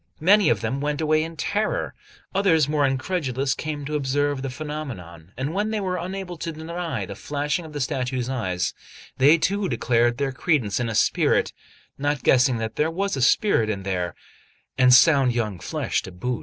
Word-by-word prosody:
Many 200 +5 +5
of - - +1
them 135 +1 -2
went 145 0 -1
away 155 0 +2
in 165 0 -7
terror; 210 +6 -1 0.4
others, 175 -7 +3
more 150 -1 +2
incredulous, 135 -1 -1
came 150 -2 -5
to 150 - -5
observe 145 -1 0
the 135 - -3
phenomenon, 125 - -7
and 135 +5 -3
when 205 +3 0
they 220 -1 -1
were 185 -2 -2
unable 180 0 -5
to 165 - -4
deny 160 - -4
the 100 - -7
flashing 145 - -3
of 155 - -11
the 145 - -4
statue's 125 -2 -2
eyes, 95 -9 -2 0.5
they 145 +5 +6
too 195 +4 0
declared 120 -1 +1
their 140 -1 -1
credence 130 - 0
in 120 -1 -1
a 110 - -3
spirit - - +2 0.5
not 145 0 -1
guessing 130 -1 +4
that 110 0 -4
there 155 +2 +2
was 195 +2 -2
a 135 - -3
spirit 110 - +2
there, 90 -2 -2 0.6
and 125 -1 +5
sound 135 -1 +6
young 105 -6 -2
flesh - - -2
to 95 - -9
boot. 120 +7 -3
140 Hz, 185 wpm, -24 LUFS, 125-160 Hz, 0.6 s, they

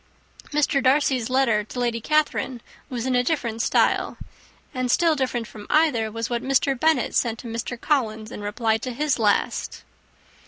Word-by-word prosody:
Mr. 290 -1 +2
Darcy's 260 -3 +2
letter 255 -5 +2
to 230 +4 -8
Lady 235 -1 -1
Catherine 290 -3 0 0.3
was 245 -2 -4
in 260 - 0
a 245 - +3
different 240 -6 -1
style, - - +1 0.6
and 255 -2 -2
still 330 +4 +3
different 255 -4 -1
from 210 -1 -11
either 255 -9 +2
was 230 +1 -3
what 240 -1 -2
Mr. 275 +1 +2
Bennet 320 +2 +2
sent 230 -2 +1
to 240 - -9
Mr. 230 +1 -4
Collins, 225 -7 -1
in - - -7
return 220 +2 0
for 255 - -5
his 270 +1 -1
last. 210 -2 0
245 Hz, 165 wpm, -24 LUFS, 225-275 Hz, 0.6 s, a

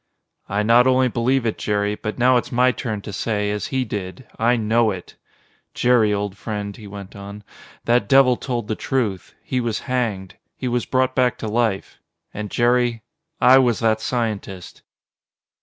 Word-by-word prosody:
"I 100 +2 0
not 120 +3 +5
only 130 0 +3
believe 125 +2 0
it, 110 - -2
Jerry, 105 0 0
but 105 0 -5
now 125 +1 +4
it's 120 - -3
my 125 +1 +3
turn 110 -5 -4
to 105 0 -8
say, 105 -1 -1
as 105 0 -3
he 130 -1 -1
did, 105 +3 -6
I 120 +2 +3
know 115 0 +2
it! 95 -3 -7 0.6
Jerry, 120 -4 +3
old 100 -1 -2
friend," 105 -1 -5
he 110 -4 -11
went 100 -1 -10
on, 100 +1 -9 0.4
"that 120 -4 +2
devil 135 -2 +6
told 120 -4 -4
the 110 - -1
truth. 110 -6 -2
He 125 - -1
was 115 -2 -2
hanged. 110 -8 -3 0.2
He 130 - -4
was 120 -1 -1
brought 130 0 +1
back 125 -2 +1
to 110 - -5
life; 110 -2 -1 0.3
and 105 0 -5
Jerry 120 -1 +1 0.4
I 130 +1 +7
was 120 -4 +2
that 110 -1 +2
scientist!" 105 -6 -4
115 Hz, 175 wpm, -21 LUFS, 105-125 Hz, 0.6 s, I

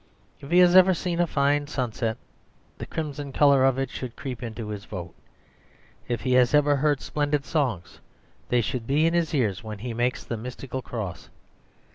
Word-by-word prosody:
If 140 - -11
he 175 - +3
has 180 0 +5
ever 185 0 +7
seen 175 -1 -2
a 175 - +3
fine 145 0 +1
sunset, 120 -5 -2 0.6
the - - -6
crimson 145 -3 -5
colour 140 -1 +4
of 135 -1 +3
it 135 -1 -2
should 125 -3 -6
creep 130 -3 -6
into 115 -2 -6
his 105 -1 -5
vote. 90 -3 -7 0.9
If 120 -3 -2
he 130 +4 0
has 125 +2 +4
ever 145 -1 +4
heard 145 0 +1
splendid 145 -1 -1
songs, 130 - -2 0.5
they 125 -1 +3
should 115 0 -3
be 150 +4 +3
in 165 - +2
his 170 -2 +1
ears 110 -7 0
when 110 -1 -6
he 115 +3 -5
makes 120 +3 -1
the 115 - -4
mystical 125 +3 -6
cross. 100 -9 -6
130 Hz, 185 wpm, -25 LUFS, 115-145 Hz, 0.9 s, ever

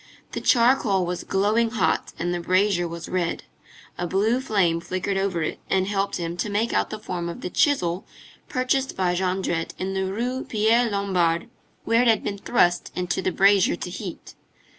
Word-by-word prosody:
The - - -4
charcoal 230 -6 +3
was 180 0 -3
glowing 215 +4 +1
hot 190 -9 0
and 175 +1 -1
the 175 - -2
brazier 185 0 +2
was 170 0 -7
red; 175 -2 -2 0.6
a 175 - -1
blue 215 +8 +1
flame 190 -9 +1
flickered 185 +3 -2
over 195 -4 0
it, - - -3
and 190 -1 +2
helped 200 0 -1
him 170 0 -4
to 210 - -2
make 210 +3 0
out - - +1
the 215 - -5
form 180 -5 -4
of 170 - -7
the 180 - -5
chisel 180 - +1 0.4
purchased 265 +1 0
by 180 -2 +1
Jondrette 180 -2 -1
in 190 +1 -3
the 190 0 -1
Rue 245 +5 -2
Pierre 230 +2 +2
Lombard, 190 -2 0 0.3
where 230 +1 +3
it 250 - +2
had 225 -1 +3
been 200 -1 -3
thrust 175 -5 +1
into 180 +1 -1
the 185 - 0
brazier 200 - +4
to - - -6
heat. - - -7
195 Hz, 185 wpm, -24 LUFS, 175-220 Hz, 0.6 s, brazier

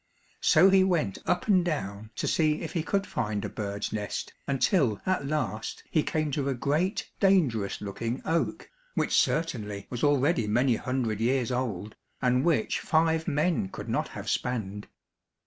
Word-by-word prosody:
So 185 +5 +6
he 190 -1 +6
went 165 - 0
up 180 +2 +1
and 190 -4 +4
down 110 - -3
to - - -2
see 155 -2 +2
if 160 - -5
he 170 - 0
could 195 +4 0
find 105 - -2
a - - -3
bird's 100 0 -4
nest 105 -2 -4
until 135 - +2
at 185 -7 0
last 140 -7 -3
he 155 - +3
came 155 -1 -1
to 140 0 -1
a 135 - 0
great 155 - -1
dangerous 150 - +2
looking 115 +5 -3
oak, 165 +1 -1 0.2
which - - 0
certainly 110 -11 0
was 120 - -4
already 145 -4 +3
many 120 +3 +3
hundred 125 -5 -2
years 125 +1 +1
old, 110 -5 -3 0.2
and 125 0 +2
which 155 -9 +1
five 160 0 +1
men 150 - +1
could - - -8
not - - 0
have - - -8
spanned. 105 -5 -2
135 Hz, 165 wpm, -28 LUFS, 110-165 Hz, 0.2 s, So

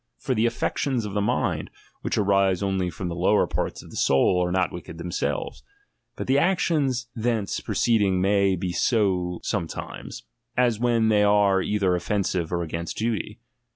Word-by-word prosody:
For 130 - -2
the 115 0 +2
affec 120 - -2
tions 130 -6 0
of 100 - -5
the 105 - 0
mind, 100 - -1 0.3
which - - -2
arise 100 -2 +2
only 95 -2 0
from 90 +2 -5
the 85 - -4
lower 95 +4 +3
parts - - -3
of - - -14
the - - -10
soul, 90 +7 +3
are 90 - -1
not 95 -1 +1
wicked 85 -1 -8
themselves; 75 -6 -3 0.5
but - - -5
the 135 +2 +3
actions 145 -8 +1
thence 115 -3 -1
proceeding 105 -6 +1
may 100 0 +3
be 90 0 -3
so 90 -3 +1
some 95 -6 -1
times, - - -8 0.3
as 120 -3 +2
when 115 -2 +2
they 105 -1 +4
are 100 -2 +4
either 100 -2 +1
offensive 90 -2 -1
or 85 -1 -1
against 85 +1 -5
duty. 110 -1 -2
100 Hz, 175 wpm, -25 LUFS, 90-115 Hz, 0.5 s, they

